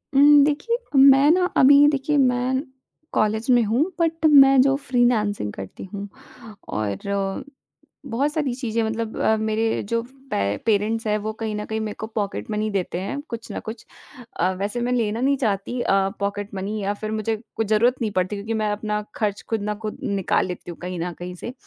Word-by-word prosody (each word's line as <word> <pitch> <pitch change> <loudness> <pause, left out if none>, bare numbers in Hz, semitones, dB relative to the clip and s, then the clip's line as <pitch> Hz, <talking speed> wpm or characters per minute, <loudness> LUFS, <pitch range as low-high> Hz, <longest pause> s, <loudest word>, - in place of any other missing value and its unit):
उम, 290 +1 +7
देखिए 300 +11 0 0.2
मैं 275 +1 +7
ना 360 +2 +3
अभी 285 +2 +7
देखिए 295 +1 +1
मैं 255 0 +2 0.5
कॉलेज 220 +3 0
में 245 -1 +5
हूँ 225 +6 +2 0.2
बट 325 -1 0
मैं 275 -3 +7
जो 270 +1 +3
फ़्रीलांसिंग 240 - 0
करती 95 -1 -8
हूँ 200 0 -5 0.6
और 195 - -3 0.6
बहुत 275 +3 -1
सारी 290 -6 -1
चीज़ें 230 -3 -2
मतलब 220 0 -3 0.3
मेरे 220 +1 0
जो 230 0 +1 0.3
पे 100 +1 0
पेरेंट्स 220 +1 +1
हैं 210 0 +2
वो 215 +1 -3
कहीं 220 -1 -3
न 210 - -3
कहीं 220 0 -3
मेरे 215 -1 -4
को 220 - -4
पॉकेट 210 -2 -4
मनी 215 0 -1
देते 185 -3 -2
हैं 280 +8 -4
कुछ 230 -2 -7
ना - - -4
कुछ। 220 +1 -8 0.5
अ, 180 +2 +2
वैसे 205 +4 -2
मैं 245 +1 -1
लेना 225 -1 0
नहीं 275 +2 +2
चाहती 220 -1 -2
अ, 195 - +1 0.3
पॉकेट 205 0 -3
मनी 195 +3 -3
या 200 +1 -1
फिर 215 +1 -6
मुझे 220 +1 -1 0.2
कुछ 225 - -1
ज़रूरत 225 +4 +3
नहीं 220 -2 -1
पड़ती 185 +1 -1
क्योंकि 205 +3 -4
मैं 215 - 0
अपना 210 0 -2
खर्च 210 -2 -1
खुद 225 -2 -1
ना 210 +1 -2
खुद 215 - -4
निकाल 195 -2 0
लेती 180 -1 -7
हूँ 170 - -10
कहीं 180 0 -5
न 175 +2 -3
कहीं 180 +1 -6
से। 235 +7 -7
220 Hz, 190 wpm, -23 LUFS, 205-255 Hz, 0.6 s, उम